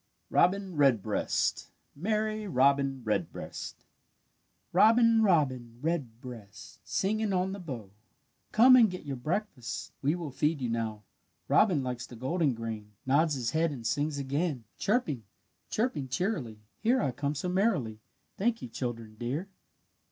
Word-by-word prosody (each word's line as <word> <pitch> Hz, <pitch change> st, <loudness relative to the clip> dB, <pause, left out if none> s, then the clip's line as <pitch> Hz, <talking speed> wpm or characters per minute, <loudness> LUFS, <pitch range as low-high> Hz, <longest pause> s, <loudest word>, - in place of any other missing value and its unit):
ROBIN 190 Hz, -2 st, +2 dB
REDBREAST 135 Hz, -8 st, +1 dB, 0.3 s
MERRY 215 Hz, +5 st, -1 dB
ROBIN 135 Hz, -3 st, +2 dB
REDBREAST 110 Hz, -, -4 dB, 0.9 s
"Robin, 225 Hz, +4 st, +6 dB
robin 130 Hz, -, +2 dB
redbreast, 120 Hz, -8 st, -5 dB
Singing 215 Hz, +2 st, 0 dB
on 185 Hz, 0 st, +1 dB
the 200 Hz, -, -5 dB
bough, 125 Hz, -, -7 dB, 0.6 s
Come 250 Hz, +4 st, +8 dB
and 235 Hz, -4 st, +7 dB
get 180 Hz, -3 st, -7 dB
your 140 Hz, -2 st, -3 dB
breakfast, 130 Hz, -, -3 dB
We 145 Hz, +4 st, +2 dB
will 165 Hz, -5 st, -5 dB
feed 150 Hz, +3 st, 0 dB
you 125 Hz, -2 st, -2 dB
now. 110 Hz, -2 st, -2 dB, 0.4 s
Robin 180 Hz, -10 st, +4 dB
likes 125 Hz, -1 st, -4 dB
the 125 Hz, -, -11 dB
golden 135 Hz, +3 st, 0 dB
grain, 110 Hz, -2 st, -6 dB
Nods 145 Hz, +3 st, +3 dB
his 120 Hz, -4 st, -2 dB
head 165 Hz, +1 st, +2 dB
and 120 Hz, -5 st, -7 dB
sings 145 Hz, +6 st, 0 dB
again: 140 Hz, -1 st, -1 dB, 0.2 s
'Chirping, 195 Hz, -, 0 dB, 0.5 s
chirping 210 Hz, -, -1 dB
cheerily, 135 Hz, -, -2 dB, 0.2 s
Here 245 Hz, +4 st, +3 dB
I 140 Hz, -, +1 dB
come 145 Hz, +3 st, -2 dB
so 150 Hz, -, -3 dB
merrily, 180 Hz, -, +1 dB, 0.4 s
Thank 230 Hz, +3 st, +1 dB
you, -, -, -6 dB
children 115 Hz, -3 st, -5 dB
dear!'" 140 Hz, +11 st, -3 dB
145 Hz, 135 wpm, -30 LUFS, 120-190 Hz, 0.9 s, Come